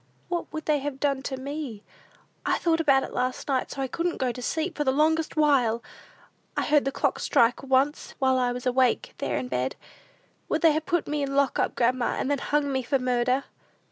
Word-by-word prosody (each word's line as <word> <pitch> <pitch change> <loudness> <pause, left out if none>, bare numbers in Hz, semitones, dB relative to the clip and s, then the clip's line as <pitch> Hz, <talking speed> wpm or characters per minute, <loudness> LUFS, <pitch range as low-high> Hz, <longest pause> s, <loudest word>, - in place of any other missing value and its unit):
What 350 -1 -3
would 315 -1 -5
they 300 -1 +2
have 275 -1 -5
done 275 -2 0
to 270 -1 -4
me? 270 -5 -6 0.6
I - - +1
thought 330 -1 +1
about 275 -4 +4
it - - -7
last 255 0 -2
night, 265 -3 0
so 270 - -4
I - - -1
couldn't 340 +6 -2
go 255 -2 0
to 250 - -8
sleep 320 +7 -2
for 295 - 0
the 265 - +2
longest 315 +3 +1
while! 255 -7 +3 0.7
I - - +1
heard 295 -2 +3
the 275 - 0
clock - - 0
strike 235 +1 +3
once 270 +2 0
while 260 -1 +2
I 250 -1 +1
was 245 +1 -5
awake 255 0 +2
there - - -1
in 250 - -3
bed! 130 - -2 0.7
Would - - 0
they 325 - +7
have 310 +1 -2
put 345 -1 0
me 295 0 -1
in 280 - -1
the 275 - -4
lock 280 -1 +2
up, - - 0
grandma, 245 0 +1
and 275 - -1
then 285 - +1
hung 290 0 0
me 265 -1 0
for 265 +3 +1
murder?" 250 +1 +1
275 Hz, 225 wpm, -26 LUFS, 255-300 Hz, 0.7 s, they